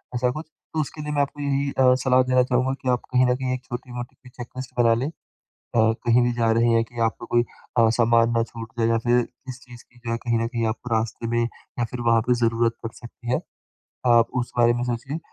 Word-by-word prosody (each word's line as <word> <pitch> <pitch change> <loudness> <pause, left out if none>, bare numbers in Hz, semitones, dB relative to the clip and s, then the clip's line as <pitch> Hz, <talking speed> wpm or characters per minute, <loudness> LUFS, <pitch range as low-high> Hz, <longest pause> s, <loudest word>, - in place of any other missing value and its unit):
ऐसा 125 0 +2
कुछ? 155 +5 -6 0.3
तो 160 - -1
उसके 150 +1 -6
लिए 150 0 -4
मैं 145 - +2
आपको 140 +1 -3
यही 140 0 0
अ, 130 -1 +4
सलाह 130 -1 +4
देना 130 0 +3
चाहूँगा 125 +1 +1
कि 130 - -1
आपको 125 0 -1
कहीं 130 - +6
न - - +2
कहीं 130 0 -2
एक 130 0 -5
छोटी-मोटी 120 0 -7
सी 125 - -17
चेक 120 -1 -9
लिस्ट 130 -1 -6
बना 115 -1 +5
लें। 120 +4 -1
अ, - - -5 0.7
कहीं 115 +2 +3
भी 120 - +2
जा 115 -1 +3
रहे 115 +1 +3
हैं 115 0 +4
कि 120 0 -11
आपका - - -11
कोई 120 0 +4 0.4
अ, 115 -1 +6
सामान 115 0 +4
ना 115 - +3
छूट 115 -1 -9
जाए 115 - +3
या 115 0 +3
फिर 120 +1 +5
किस 125 +1 -11
चीज़ 120 -1 -13
की 120 - -24
जो 115 - 0
कहीं 115 -1 0
न 115 - 0
कहीं 115 -1 -2
आपको 115 +1 -6
रास्ते 115 +1 -2
में 120 +1 +1
या 120 0 -5
फिर 125 - -4
वहाँ 115 -1 +4
पे 125 - +5
ज़रूरत 115 0 +1
पड़ 115 - -4
सकती 120 0 -8
है। 125 - +2 0.7
आप 115 -1 +5
उस 120 - -6
बारे 120 0 +5
में 120 0 -2
सोचिए 125 +5 -3
120 Hz, 245 wpm, -24 LUFS, 115-125 Hz, 0.7 s, कहीं